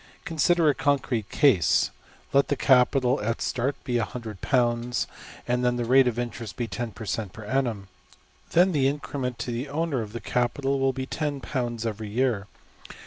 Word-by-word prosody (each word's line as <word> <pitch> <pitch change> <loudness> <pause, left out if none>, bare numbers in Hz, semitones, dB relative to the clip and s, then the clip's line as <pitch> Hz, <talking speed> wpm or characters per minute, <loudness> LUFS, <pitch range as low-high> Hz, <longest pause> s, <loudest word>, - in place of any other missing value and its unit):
} - - -30
Consider 165 +1 +2
a 145 - +5
concrete 130 -7 0
case. 125 - +3 0.4
Let 140 0 +4
the 145 - +1
capital 130 -1 +3
at 115 +3 -1
start 130 +3 -1
be~£$100$, 120 0 -1 0.4
and 125 0 +1
let 125 0 +1
the 120 - -1
rate 130 +2 +5
of 120 -2 -1
interest 120 -5 -4
be 120 - -2
$10$~per~cent.\ 110 -4 -4
per~annum. 110 -2 -2 0.6
Then 180 +3 +4
the 140 -5 +2
increment 135 -3 -3
to 120 +2 -4
the 120 +4 -3
owner 150 -3 -1
of 105 -1 -7
the 120 - -4
capital 135 +5 0
will 135 0 +3
be 130 0 -4
£$10$ 130 -6 -3
every 110 -1 -4
year. 115 -3 0
125 Hz, 155 wpm, -26 LUFS, 115-135 Hz, 0.6 s, a